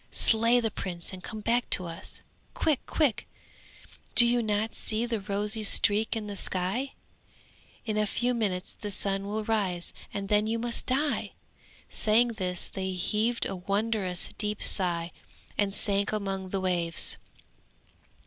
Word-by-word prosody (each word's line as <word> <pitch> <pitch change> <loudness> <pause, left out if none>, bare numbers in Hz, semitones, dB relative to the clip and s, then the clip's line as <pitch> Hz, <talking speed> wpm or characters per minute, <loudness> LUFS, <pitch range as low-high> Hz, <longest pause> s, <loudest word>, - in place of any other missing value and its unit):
Slay 230 +2 +5
the 225 -2 -1
prince 175 -3 -1
and 185 - -8
come 220 -2 -6
back 235 +3 +1
to 180 - +6
us! 170 +2 -2 0.3
Quick! 310 -5 +1
Quick! 290 -9 +1 0.9
do 240 - +9
you 240 0 +3
not 215 0 -1
see 220 +2 -2
the 235 -2 -2
rosy 205 +2 -1
streak 210 +1 +4
in 220 -2 -3
the 205 -1 -6
sky? 195 +9 -1 0.9
In 215 -2 -1
a 210 0 +2
few 245 +4 0
minutes 200 -6 -2
the 210 - -7
sun 195 0 +1
will 215 +1 -2
rise 195 -6 -1 0.2
and 200 -1 -4
then 210 +1 +2
you 225 +1 0
must 235 0 -2
die!' 280 +3 0 0.6
saying 225 +3 +3
this 185 -6 -3
they 190 -1 -4
heaved 215 +6 0
a - - -3
wondrous 200 -1 0
deep 210 0 -1
sigh 170 -3 +2 0.4
and 205 -1 +1
sank 200 0 0
among 195 -3 -3
the 195 0 -2
waves. 175 -3 -1
210 Hz, 150 wpm, -28 LUFS, 190-225 Hz, 0.9 s, do